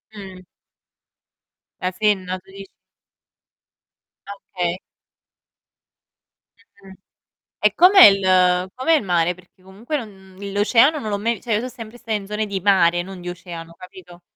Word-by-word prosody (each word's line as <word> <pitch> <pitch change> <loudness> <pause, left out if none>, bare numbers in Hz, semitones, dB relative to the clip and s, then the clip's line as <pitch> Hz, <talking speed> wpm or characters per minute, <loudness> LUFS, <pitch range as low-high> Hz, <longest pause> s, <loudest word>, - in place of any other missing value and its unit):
Mh. 190 -3 -11 1.4
La 185 - -2
Senna 185 -2 -1
tu 190 +1 -21
dici? 195 0 -11 1.6
Okay. 180 -3 -5 2.0
Mh-mh. 195 -1 -14 0.7
E - - +2
com'è 375 +2 +7
il 185 -2 +3
com'è 260 +6 0
il 315 - +3
mare? 175 -1 0
Perché 185 +1 -23
comunque 205 +10 -6
non 230 -7 -6 0.3
mhmm, 200 0 -7
l'oceano 230 +9 +3
non 220 - -6
l'ho 205 -1 -2
mai 230 +3 -1
vi 210 - -13
cioè 235 - -5
io 210 - 0
so' 250 - -5
sempre 230 -2 -11
sta 230 -2 -7
in 205 -2 -3
zone 210 +1 -3
di 200 -2 -4
mare, 175 -3 +2
non 190 0 -10
di 175 - -7
oceano, 170 -2 -10
capito? 180 -1 -14
195 Hz, 145 wpm, -20 LUFS, 180-215 Hz, 2.0 s, com'è